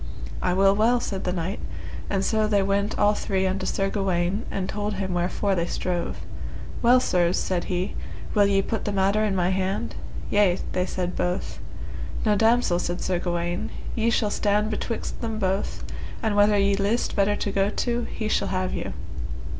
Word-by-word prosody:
I 180 - +2
will 195 +1 +5
well, 230 +4 +4
said 195 -5 -3
the 180 - +1
knight, 180 +2 -2 0.5
and 195 -1 +1
so 215 -1 +2
they 205 -2 +3
went 200 +1 0
all 205 0 +4
three 190 -2 0
unto 190 0 -1
Sir 195 +1 +1
Gawaine 190 0 0
and 185 -1 -2
told 210 0 -2
him 190 -1 -2
wherefore 180 +3 0
they 170 -2 0
strove. 175 -1 -2 0.6
Well, 245 +2 +6
sirs, 180 -7 +2
said 180 -2 -1
he, 180 +1 -1 0.4
will 205 -1 +5
ye 195 -1 +3
put 225 - -2
the 205 - 0
matter 200 +2 +2
in 205 -2 +1
my 180 -1 +2
hand? 190 +4 -1 0.4
Yea, 200 -3 +4
they 180 0 0
said 180 -1 -2
both. 180 +1 -2 0.7
Now 210 - +4
damosel, 220 -4 +3
said 175 0 -2
Sir 180 -2 0
Gawaine, 175 0 -1 0.2
ye 230 0 +2
shall 215 -3 +1
stand 210 +1 +1
betwixt 225 +2 -3
them 225 -2 -2
both, 195 -1 -1 0.4
and 220 -2 +1
whether 205 0 +5
ye 200 0 +3
list 205 +4 0
better 205 0 +3
to 205 - -2
go 195 0 +2
to, 240 +2 -1
he 220 - -4
shall - - +1
have 185 -1 -1
you. - - -3
195 Hz, 185 wpm, -25 LUFS, 185-210 Hz, 0.7 s, Well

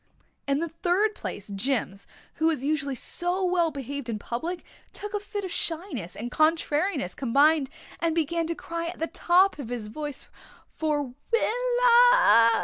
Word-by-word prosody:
In 275 0 +2
the 335 +3 -1
third 360 +6 +1
place, - - -7
Jims, 200 -2 -2 0.3
who 320 - +2
was 300 -5 0
usually 285 -2 -1
so 355 +8 0
well 355 -2 +2
behaved 280 -2 -6
in 220 - -2
public, 325 - -5 0.3
took 415 0 -7
a 415 - 0
fit 410 0 -5
of 375 - -5
shyness 320 - -3
and 240 +3 -6
contrariness 310 - +1
combined 280 +3 +3 0.3
and 330 -1 0
began 330 +1 0
to 335 - -2
cry 335 0 -5
at 345 - -6
the 325 - -1
top 355 +1 +3
of 250 -5 -6
his 235 -4 -4
voice 290 +4 -6 0.4
for 290 -5 -2 0.2
"Willa." 485 - +5
320 Hz, 155 wpm, -26 LUFS, 275-360 Hz, 0.4 s, Willa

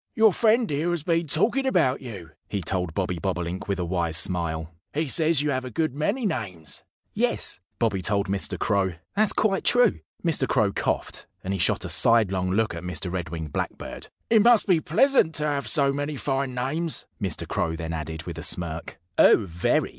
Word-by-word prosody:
"Your 220 -3 +5
friend 230 +3 +3
here 150 +2 -1
has 175 -4 -2
been 165 0 0
talking 240 - +1
about 160 - +2
you," 100 -10 -9 0.2
he 100 -3 -3
told 90 -2 -2
Bobby 90 -3 -2
Bobolink 90 +1 -3
with 100 -1 -1
a 90 - -2
wise 85 -2 +1
smile. 85 -2 0 0.2
"He 155 +1 0
says 155 +1 +3
you 150 - 0
have 130 -1 -1
a 130 - -6
good 155 +2 -1
many 200 - -1
names." 95 - -4 0.3
"Yes!" - - +1 0.2
Bobby 105 -5 0
told 100 +2 +1
Mr. 100 0 -1
Crow. 100 -3 0 0.2
"That's 215 0 +5
quite 195 -3 +1
true." 245 0 +3 0.3
Mr. 165 -3 +2
Crow 110 -6 +2
coughed; - - -2 0.2
and 95 - -2
he 95 - -2
shot - - +1
a - - -5
sidelong 95 -5 +3
look 110 +2 +1
at 85 - -6
Mr. 90 0 -4
Red 90 -3 -3
winged 80 -2 -6
Blackbird. - - -5 0.2
"It 220 -2 +6
must 235 0 +5
be 180 -5 +3
pleasant 220 - +3
to 150 - 0
have 145 -2 -1
so 140 -2 +2
many 145 +1 -3
fine 135 -1 -2
names," 150 +7 -2 0.2
Mr. 95 -6 -2
Crow 80 0 -1
then 80 0 -5
added, 80 0 -5
with - - -7
a - - -6
smirk. 85 -1 +1 0.2
"Oh, 105 - +6
very!" 85 -1 0
115 Hz, 195 wpm, -25 LUFS, -, 0.3 s, It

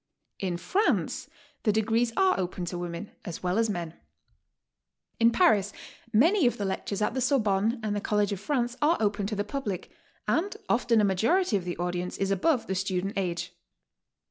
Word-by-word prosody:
In 180 -3 -2
France 260 - 0 0.3
the 215 - +2
degrees 225 +2 +1
are 380 - +3
open 180 -1 -3
to 175 +1 -4
women 175 +3 -5
as 175 -4 -7
well 180 +4 +1
as 225 -1 +2
men. 170 -5 -3 1.3
In 230 0 +6
Paris 215 - +3 0.4
many 305 - +4
of 240 - 0
the 205 - -2
lectures 195 +2 -2
at - - 0
the 260 - -1
Sorbonne 225 -3 +2
and 210 -1 -1
the 205 - -2
College 210 -1 +1
of 200 - -3
France 245 +1 -1
are 315 +4 +4
open 205 -1 0
to 210 - -3
the 205 - 0
public, 210 -5 -4 0.4
and 390 +5 0
often 235 -2 +3
a - - +2
ma 195 -2 +3
jority 280 - +2
of 190 -3 -1
the 175 - -4
audience 180 0 -3
is 195 0 0
above 240 - +2
the 190 - -2
student 190 +1 -1
age. 175 -2 -2
205 Hz, 185 wpm, -28 LUFS, 185-240 Hz, 1.3 s, In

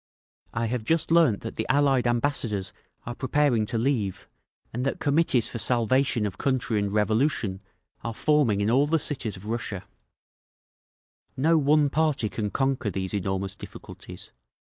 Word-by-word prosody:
"I 115 +1 -2
have 115 0 -2
just 165 +6 0
learned 165 -11 +4
that 115 - -7
the - - -2
Allied 135 -3 +3
ambassadors 120 -5 -1 0.3
are 120 - -4
preparing 130 -3 +1
to 115 - -2
leave, 110 -6 -1 0.5
and 120 +2 -2
that 135 - -2
Committees 145 -5 +2
for 115 - -5
Salvation 120 0 +2
of 100 - -5
Country 130 -5 0
and 100 -1 -1
Revolution 110 -1 0 0.4
are 115 -1 -4
forming 145 -10 +2
in 105 +2 +1
all 135 +4 +3
the 165 +2 +2
cities 120 -9 -2
of 95 - -13
Russia…. 110 -4 -4 1.5
"No 160 +4 +3
one 145 0 +3
party 150 -8 +1
can 105 +2 -3
conquer 135 0 -1
these 95 -1 -3
enormous 95 -1 -2
difficulties. - - -11
120 Hz, 150 wpm, -26 LUFS, 105-140 Hz, 1.5 s, learned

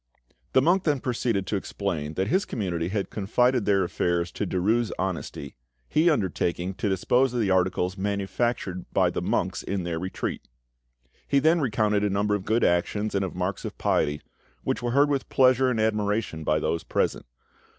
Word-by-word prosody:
The 130 - +5
monk 180 +4 +3
then 145 -4 +2
proceeded 115 -5 -1
to 105 - -2
explain 85 -6 -3
that 95 +1 0
his 190 - +2
community 85 - -2
had 100 +1 -2
confided 125 +4 +1
their 100 -2 +3
affairs 85 -1 -1
to 105 - -3
Derues' 110 +6 +1
honesty, 90 -6 -4 0.3
he 160 +3 +3
undertaking 95 - -1
to 100 - -2
dispose 125 +7 +2
of - - +1
the 100 -4 +1
articles 95 0 +1
manufactured 100 -1 -2
by - - +3
the - - -3
monks - - -1
in 95 -2 -3
their 85 -1 -3
retreat. 95 +2 -4 0.8
He 140 - +2
then 160 +4 +4
recounted 105 -5 +1
a 105 - +2
number 100 +1 +1
of 105 -2 -2
good 115 +2 +1
actions 105 +5 +1
and 100 - +1
of 95 - -4
marks 90 +1 -2
of - - -6
piety, 75 0 0 0.4
which - - -1
were 120 - -1
heard 140 +4 +4
with 140 -2 -1
pleasure 130 0 +4
and 120 -3 0
admiration 105 -5 0
by 75 0 +2
those 80 +2 -1
present. - - -1
100 Hz, 180 wpm, -26 LUFS, 90-120 Hz, 0.8 s, The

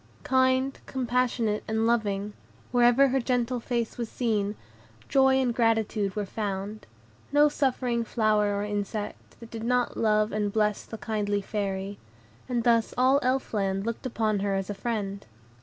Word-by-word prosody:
Kind, 260 +1 +2
compassionate, 245 -4 0
and 220 0 0
loving, 210 -3 0 0.4
wherever 245 +2 +5
her 265 +1 +1
gentle 245 0 0
face 235 0 -3
was 235 -2 -3
seen, 210 -4 -1 0.5
joy 265 -1 +4
and 260 -2 +2
gratitude 220 -4 +1
were 210 -1 -1
found; 205 - -4 0.4
no 290 +1 +6
suffering 250 -4 0
flower 215 -2 +2
or 200 - -1
insect, 205 0 -4
that 230 -1 -12
did 225 -1 -6
not 250 +1 0
love 215 -1 +2
and 210 -1 -1
bless 210 -1 0
the 225 - -8
kindly 210 -2 -1
Fairy; 200 -1 -3 0.5
and 240 -2 0
thus 230 -1 +2
all 260 +2 +4
Elf 260 -1 0
Land 195 -1 0
looked 230 +2 -3
upon 220 -4 0
her 200 0 0
as 195 +1 -2
a - - -2
friend. 200 -3 -3
225 Hz, 155 wpm, -27 LUFS, 205-245 Hz, 0.5 s, no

